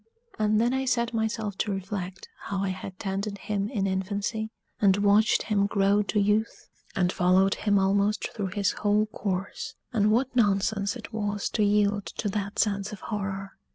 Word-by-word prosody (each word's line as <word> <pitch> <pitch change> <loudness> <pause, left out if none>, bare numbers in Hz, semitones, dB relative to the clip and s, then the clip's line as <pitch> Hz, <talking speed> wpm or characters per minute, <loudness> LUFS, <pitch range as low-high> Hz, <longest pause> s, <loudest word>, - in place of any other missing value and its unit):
And 215 0 +3
then 240 +3 +2
I 265 0 0
set 240 -2 0
myself 220 -2 -2
to 210 - 0
reflect 195 -1 -5 0.2
how 195 -1 -2
I 195 - 0
had 185 0 -6
tended 200 +2 -3
him 200 0 -2
in 205 -7 -1
infancy, 200 +3 -2 0.3
and 195 -2 +5
watched 205 +2 +4
him 200 -2 +1
grow 200 0 +3
to 210 +1 0
youth, 210 +2 0 0.3
and 180 -1 +2
followed 185 +2 +4
him 205 -1 +1
almost 200 +2 +1
through 205 -3 -2
his 200 -1 +1
whole 210 +1 +2
course, 195 -3 -4 0.2
and 210 -2 +3
what 250 +4 +1
nonsense 200 -1 +2
it 240 - -9
was 205 -2 -2
to 215 - +1
yield 205 0 +2
to 210 - -1
that 200 0 -3
sense 200 -2 0
of 210 - -7
horror. 195 -2 -4
205 Hz, 175 wpm, -27 LUFS, 195-215 Hz, 0.3 s, and